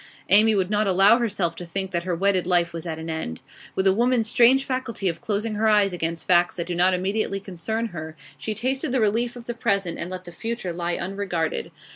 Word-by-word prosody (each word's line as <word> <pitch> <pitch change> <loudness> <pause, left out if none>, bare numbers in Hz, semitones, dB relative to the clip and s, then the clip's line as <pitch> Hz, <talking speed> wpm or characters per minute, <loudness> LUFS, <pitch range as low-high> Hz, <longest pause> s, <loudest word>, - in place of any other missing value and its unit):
Amy 215 +3 +6
would 190 0 0
not 210 0 +2
allow 195 +5 +5
herself 200 -7 -1
to - - -7
think 190 +2 -4
that 170 -1 -2
her 180 -2 -1
wedded 185 0 +1
life 175 -2 +2
was 165 +1 -6
at 160 -1 -3
an 160 0 -7
end. 160 - -4 0.4
With 190 - 0
a 190 - +5
woman's 240 +1 +2
strange 250 +4 +5
faculty 255 -6 -3
of 165 -2 -2
closing 215 -1 -2
her 215 +1 +1
eyes 205 -3 +4
against 165 -1 -3
facts 175 -1 +3
that 170 - -3
do 175 - -4
not 180 +2 +3
immediately 195 +2 -1
concern 205 +5 -4
her, 160 -3 -7 0.2
she 215 +10 -4
tasted 260 +3 -1
the 260 - +1
relief 230 +3 +1
of 240 -1 -10
the 240 - -3
present 200 -6 -1
and 170 - -4
let 185 0 -6
the 175 - -10
future 225 -2 -4
lie 170 0 -2
unregarded. 175 - -2
195 Hz, 225 wpm, -24 LUFS, 175-220 Hz, 0.4 s, Amy